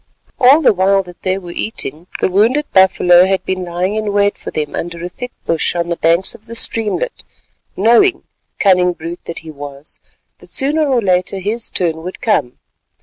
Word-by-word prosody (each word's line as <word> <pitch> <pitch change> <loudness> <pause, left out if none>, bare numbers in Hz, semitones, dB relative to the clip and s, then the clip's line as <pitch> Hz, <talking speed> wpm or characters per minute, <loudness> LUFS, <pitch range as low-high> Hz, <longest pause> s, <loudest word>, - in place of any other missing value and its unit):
All 275 +6 +6
the 255 - +5
while 195 +1 +2
that 180 -1 -14
they 185 0 0
were 175 -3 -8
eating, 170 -4 -5
the - - +3
wounded 225 +10 +2
buffalo 180 -1 +5
had 190 -1 -1
been 185 -1 -3
lying 180 +3 -2
in 215 -1 -2
wait 205 0 +2
for - - -8
them 150 -1 -4
under 170 0 -5
a - - -5
thick 250 +7 -8
bush 165 +1 0
on 170 0 -2
the 170 - 0
banks 170 +3 +1
of 220 - -15
the 230 - -8
streamlet, 230 - 0 0.5
knowing—cunning 200 - +2
brute 170 +1 -8
that 170 - -6
he 160 - -8
was—that 145 0 -13
sooner 295 +3 +1
or 250 -4 +1
later 185 0 +1
his 215 +5 -1
turn 165 -3 -1
would 180 +3 -7
come. 210 - 0
185 Hz, 180 wpm, -16 LUFS, 175-220 Hz, 0.5 s, All